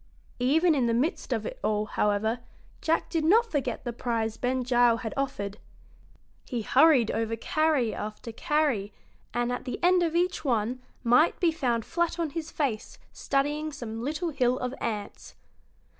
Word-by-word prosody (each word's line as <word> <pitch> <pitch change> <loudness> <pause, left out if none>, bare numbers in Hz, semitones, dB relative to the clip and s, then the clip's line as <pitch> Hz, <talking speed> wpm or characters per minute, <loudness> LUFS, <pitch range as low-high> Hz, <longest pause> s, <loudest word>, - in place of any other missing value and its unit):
Even 315 +7 +3
in 260 -5 +1
the 230 - +1
midst 295 - -1
of - - -1
it - - -6
all, 210 0 +1
however, 215 +3 0 0.4
Jack 325 +1 +1
did 330 -2 0
not 435 +9 +5
forget 265 -5 -2
the 240 - -4
prize 225 -2 -2
Ben 255 +1 -1
Gile 240 -2 +4
had 225 -2 -5
offered. 210 -7 -3 0.9
He 240 -4 -3
hurried 270 -2 +5
over 225 0 -1
carry 285 -1 +1
after 215 +2 -6
carry, 255 -6 0 0.4
and 240 +1 -1
at 245 - -4
the 250 - -4
end 360 0 +5
of 335 -1 0
each 355 -1 +1
one 245 -1 0 0.2
might 245 +8 +4
be 345 -2 +3
found 245 -8 -1
flat 340 0 -1
on 330 -3 -1
his 320 0 -5
face 255 -10 -3 0.2
studying 295 +3 -1
some 225 -5 -6
little 310 +7 -2
hill 255 -3 +1
of 250 0 -3
ants. 210 -3 -5
255 Hz, 165 wpm, -27 LUFS, 230-310 Hz, 0.9 s, not